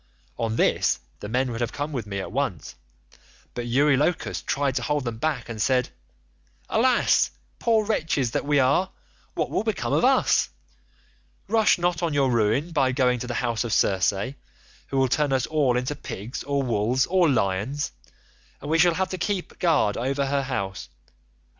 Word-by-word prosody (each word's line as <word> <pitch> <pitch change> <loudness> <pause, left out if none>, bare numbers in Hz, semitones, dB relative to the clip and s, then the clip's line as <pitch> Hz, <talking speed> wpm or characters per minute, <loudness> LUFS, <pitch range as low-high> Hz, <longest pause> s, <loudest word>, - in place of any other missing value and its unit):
"On 115 -2 -2
this - - +2 0.2
the 105 - -7
men 125 +2 0
would 115 +1 -4
have 120 - -1
come 145 +2 -3
with 120 -7 -4
me 100 -1 -4
at 95 - -5
once, 130 - -3 0.8
but 120 -1 -4
Eurylochus 145 +6 +1
tried 140 -1 -1
to - - -1
hold 150 +1 -1
them 120 -2 -4
back 140 -4 -1
and 115 -2 -5
said, 125 +1 +2 0.8
'Alas, - - +3 0.3
poor 225 -2 +2
wretches 155 - 0
that - - -1
we 145 0 +1
are, 140 +8 +2 0.5
what - - -1
will - - 0
become - - -2
of - - +2
us? - - +3 1.0
Rush 220 +1 +3
not 175 -1 0
on 165 -4 -1
your 135 -2 +2
ruin 115 +8 +1
by 135 -5 +2
going 125 -1 +2
to 125 - -5
the 120 - -3
house 115 -1 0
of 120 - -3
Circe, 100 +5 +1 0.5
who 135 - -3
will 135 0 +3
turn 145 +3 +1
us 130 -2 +1
all 140 -6 +1
into 130 +4 -2
pigs 115 -4 -7
or 140 0 0
wolves 120 +2 +1
or 180 -3 +3
lions, 120 +4 0 0.7
and 145 - -6
we 165 - +3
shall 175 0 +5
have 190 +1 -1
to 185 - -5
keep 190 0 -3
guard 150 - +2
over 135 +3 -1
her 140 +1 0
house. 100 -8 -4
135 Hz, 180 wpm, -25 LUFS, 120-150 Hz, 1.0 s, shall